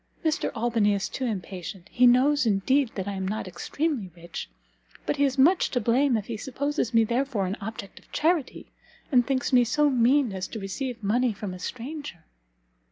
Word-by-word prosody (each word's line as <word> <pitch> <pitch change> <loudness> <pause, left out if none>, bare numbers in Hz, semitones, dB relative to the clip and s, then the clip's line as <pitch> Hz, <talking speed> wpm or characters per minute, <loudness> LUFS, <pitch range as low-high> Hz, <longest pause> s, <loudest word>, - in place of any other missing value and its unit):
Mr 315 0 +1
Albany 225 -3 +2
is 195 - -2
too 260 - -4
impatient. 185 -4 -5
He 250 0 +5
knows, 260 +2 +4
indeed, 235 +6 +2
that 190 -1 -4
I - - -1
am 190 -1 -3
not 210 0 -3
extremely 225 - -2
rich, 170 - -7 0.6
but - - -1
he 285 - +2
is 270 -1 -1
much 340 +8 +4
to 250 - 0
blame 245 +3 +2
if 210 - -4
he 225 -1 -5
supposes 275 +1 -2
me 230 -2 +5
therefore 235 -2 0
an 185 +2 -2
object 200 -1 -7
of - - -26
charity, 320 -3 0 0.5
and 245 -3 +4
thinks 265 -2 -1
me 250 -1 +7
so 295 +5 +2
mean 250 -1 +3
as 190 -1 -4
to 220 - -7
receive 230 +4 -5
money 235 +4 +2
from 200 -2 -6
a 185 - -8
stranger." 250 - -6
240 Hz, 190 wpm, -26 LUFS, 200-270 Hz, 0.6 s, me